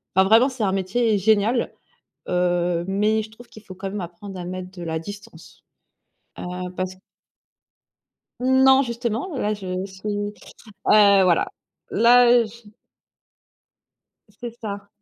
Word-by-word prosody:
enfin, 190 0 +5
vraiment, 230 +6 +5
c'est 255 -4 -5
un 195 - +1
métier 205 +4 +1
génial, 220 +4 +2 0.6
heu, 175 -1 0
mais 210 +3 +1
je 215 - -11
trouve 240 +2 -15
qu'il 215 - -14
faut 185 - -11
quand 195 +1 -5
même 205 +1 -5
apprendre 180 +2 -8
à 175 - -6
mettre 185 0 -6
de 175 -2 -9
la 160 -1 -3
distance, 205 +4 -12 0.8
heu, 180 0 -5
parce 185 0 -3
q 185 - -24 1.4
Non 265 +1 +5
justement, 235 - -3
là 210 -3 0
je 185 -2 -4
suis, 205 +2 -4 0.5
heu, 200 -2 +6
voilà, 180 -2 +3 0.4
là 240 0 +5
je 220 0 -14 1.6
C'est 235 +3 -8
ça. 205 -3 -7
205 Hz, 135 wpm, -22 LUFS, 185-230 Hz, 1.6 s, heu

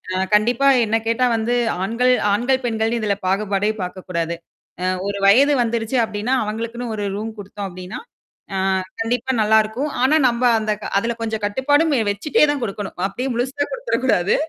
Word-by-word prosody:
அ 190 - +1
கண்டிப்பா 240 +6 +2 0.2
என்ன 220 +1 +1
கேட்டா 230 +2 +2
வந்து 225 +2 0 0.3
ஆண்கள் 240 +5 +2 0.2
ஆண்கள் 255 +5 +1
பெண்கள் 225 0 0
இதில 210 -2 0
பாகுபாடே 205 +2 +1
பார்க்கக்கூடாது. 180 -2 -4 0.5
அ - - 0 0.2
ஒரு 200 0 -2
வயது 275 +8 +6
வந்துருச்சு 230 +1 -1
அப்பிடின்னா, 220 +4 -1
அவுங்களுக்குன்னு 230 +2 -4
ஒரு 205 - -3
ரூம் 220 +2 -4
கொடுத்தோம் 200 0 -6
அப்படின்னா, 185 +4 -8 0.6
ஆ - - -1 0.4
கண்டிப்பா 245 +3 -1
நல்லாயிருக்கும். 220 +6 +2
ஆனா 290 +4 +4
நம்ம 240 +1 -1 0.2
அந்த 215 0 -1
க - - -7
அதில 235 +3 -2
கொஞ்சம் 220 -2 -3
கட்டுப்பாடும் 290 +8 +2
வெ - - +2
வச்சுட்டேதான் 290 +5 +1
கொடுக்கணும். 205 -3 -5
அப்பிடியே 250 +7 -4
முழுசா 265 +4 -1
கொடுத்துற - - -1
கூடாது. 195 -6 +2
225 Hz, 155 wpm, -20 LUFS, 205-250 Hz, 0.6 s, வயது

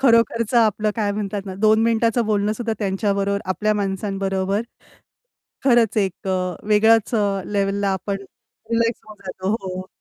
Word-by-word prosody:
खरोखरचं 230 -2 +3
आपलं 215 -1 +2
काय 210 -2 0
म्हणतात 205 -1 -3
ना 190 - -5
दोन 220 +1 +5
मिनिटाचं 230 +1 +2
बोलणं 210 -1 +1
सुद्धा 225 +1 -3
त्यांच्याबरोबर, 200 0 0
आपल्या 210 +4 0
माणसांबरोबर 195 0 -1 1.0
खरंच 235 -5 +4
एक 195 -2 -1
अ, 185 -2 -1
वेगळ्याच 220 +2 +4
अ, 200 -2 +1
लेव्हलला 200 0 0
आपण 195 +1 -3 0.5
रिलॅक्स 230 0 +1
होऊन 215 -1 -12
जातो 185 0 -4
हो. 185 -1 -6
205 Hz, 140 wpm, -21 LUFS, 195-220 Hz, 1.0 s, दोन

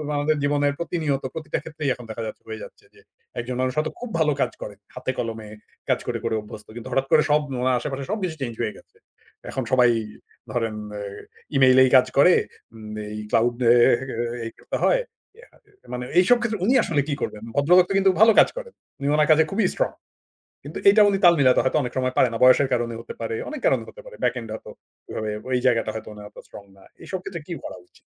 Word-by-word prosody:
আমাদের 150 +2 +1
জীবনের 145 0 +1
প্রতিনিয়ত 155 -6 -2
প্রতিটা 155 -1 -3
ক্ষেত্রেই 155 -3 -4
এখন 125 - -11
দেখা 115 +1 -5
যাচ্ছে - - -9
হয়ে 110 -1 -7
যাচ্ছে - - -14
যে, - - -20 0.4
একজন 125 +1 -4
মানুষ 130 -1 0
হয়তো 155 +1 0
খুব 245 -1 -6
ভালো 155 -1 +3
কাজ - - +1
করে। 105 - -7 0.2
হাতে 130 0 -3
কলমে 110 -2 -4 0.4
কাজ - - +2
করে, 120 -1 -1
করে 115 -1 0
অভ্যস্ত। 105 0 -11
কিন্তু 120 - -8
হঠাৎ 135 0 0
করে 155 - +6 0.4
উনার 130 0 +2
আশেপাশে 135 -1 -4
সবকিছু 185 -6 -2
চেঞ্জ 120 -3 -3
হয়ে 105 - -2
গেছে। - - -20 0.5
এখন 130 - -2
সবাই 125 -1 +5 0.6
ধরেন 115 -2 -2 0.2
এ - - -5 0.5
ইমেইল 130 -1 +5
এই 130 - +4
কাজ 130 0 +6
করে, 180 +6 +7 0.8
এই 105 - -5
ক্লাউড 120 +1 +2
অ্যা 120 - +7 0.7
অ্যাঁ 115 -1 -5
করতে - - -4
হয়। - - +3 0.4
ইয়া 470 - -16
আ - - -22 0.4
মানে 125 0 -4
এইসব 190 +7 +5
ক্ষেত্রে 220 -4 -2
উনি 250 - +3
আসলে 150 -4 +1
কী 145 - -1
করবেন? 105 +1 -4
ভদ্রলোক 175 +6 +5
তো 195 - -1
কিন্তু 195 0 +4
ভালো 225 0 +8
কাজ - - +6
করেন। 475 -1 -7 0.3
উনি 140 - -3
উনার 150 +1 +2
কাজে 160 +1 +6
খুবই 210 +2 +1
স্ট্রং। - - -1 0.7
কিন্তু - - -8
এইটা 210 +2 +6
উনি 195 - +1
তাল 175 - +8
মিলাতে 130 -2 +5
হয়তো 130 - +1
অনেক 125 -2 -4
সময় 130 0 0
পারে 125 - +4
না। 115 - -3
বয়সের 130 +2 +6
কারণে 120 -1 -1
হতে 115 - -9
পারে, 115 0 -3
অনেক 305 - -6
কারণে - - +2
হতে - - -13
পারে - - -11
ব্যাক - - +2
এন্ড 115 -2 -9
হয়তো 110 - -9 0.4
ওভাবে 110 -1 -3 0.2
ওই 125 - +2
জায়গাটা 115 -3 +2
হয়তো 110 -1 -7
উনি 105 - -11
এত - - -24
স্ট্রং 100 - -11
না। 95 - -18 0.2
এসব 190 - -4
ক্ষেত্রে 170 -3 -6
কি 175 - -4
করা - - -7
উচিত? - - -25
135 Hz, 215 wpm, -23 LUFS, 120-170 Hz, 0.8 s, ভালো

